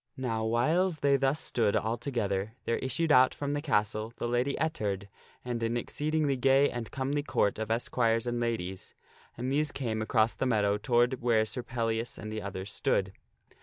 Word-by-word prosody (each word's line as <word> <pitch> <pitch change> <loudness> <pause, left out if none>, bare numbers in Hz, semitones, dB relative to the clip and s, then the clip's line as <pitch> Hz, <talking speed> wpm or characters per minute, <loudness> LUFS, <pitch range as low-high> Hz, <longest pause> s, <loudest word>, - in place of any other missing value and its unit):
Now 115 -4 -2
whiles 155 +10 +1
they 140 -1 +4
thus 135 +2 +1
stood 110 -8 0
all 110 +2 0
together, 110 -5 -2
there 115 - +1
issued 140 +5 0
out 130 -3 +6
from 145 0 -2
the 145 - -1
castle 110 -5 0
the - - -2
Lady 120 +3 0
Ettard 105 - -2 0.4
and 120 -1 -3
an 115 +1 0
exceedingly 150 +3 0
gay 135 +2 +4
and 120 -2 -5
comely 140 +2 -1
Court 105 -8 0
of 110 - -3
esquires 115 0 +1
and 120 0 -1
ladies, 105 -6 -3 0.4
and 125 +3 -2
these 145 +1 +1
came 110 -5 -2
across 110 0 +2
the 130 - -1
meadow 105 -3 +2
toward 120 +2 +2
where 115 -2 +3
Sir 125 +3 -3
Pellias 115 -1 -2
and 110 - -7
the 110 - -3
others 100 0 -5
stood. 95 -2 0
120 Hz, 180 wpm, -30 LUFS, 110-135 Hz, 0.4 s, out